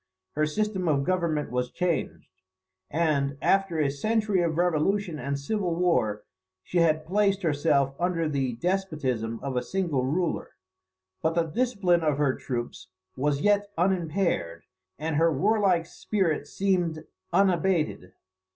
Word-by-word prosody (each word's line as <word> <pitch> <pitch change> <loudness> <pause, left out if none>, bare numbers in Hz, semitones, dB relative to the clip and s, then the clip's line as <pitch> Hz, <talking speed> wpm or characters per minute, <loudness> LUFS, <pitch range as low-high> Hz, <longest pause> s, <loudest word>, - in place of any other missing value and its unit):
Her 155 +1 0
system 195 +1 -1
of 140 -3 +2
government 170 -6 0
was 125 0 -1
changed; 175 +1 -2 0.6
and, 140 -3 0
after 195 -2 +2
a 145 -3 +2
century 210 +5 +1
of 165 -2 0
revolution 175 +1 +1
and 140 +2 -2
civil 180 +3 -1
war, 125 -13 +1 0.4
she 180 - -1
had 155 -2 +2
placed 200 +2 +1
herself 145 -3 +2
under 170 -2 0
the 135 -4 -1
despotism 130 - -2
of 135 -2 -3
a 125 - +1
single 170 -8 -1
ruler. 165 +6 -1 0.7
But 160 +1 0
the 170 - +3
discipline 195 -2 +1
of 150 -3 +1
her 145 -3 +2
troops 120 -3 -5 0.3
was 140 +1 0
yet 205 0 +3
unimpaired, 170 - 0 0.3
and 155 0 -2
her 165 +1 +4
warlike 190 +1 +2
spirit 170 -5 -1
seemed 175 -4 0 0.3
unabated. 175 - +1
165 Hz, 135 wpm, -27 LUFS, 140-185 Hz, 0.7 s, her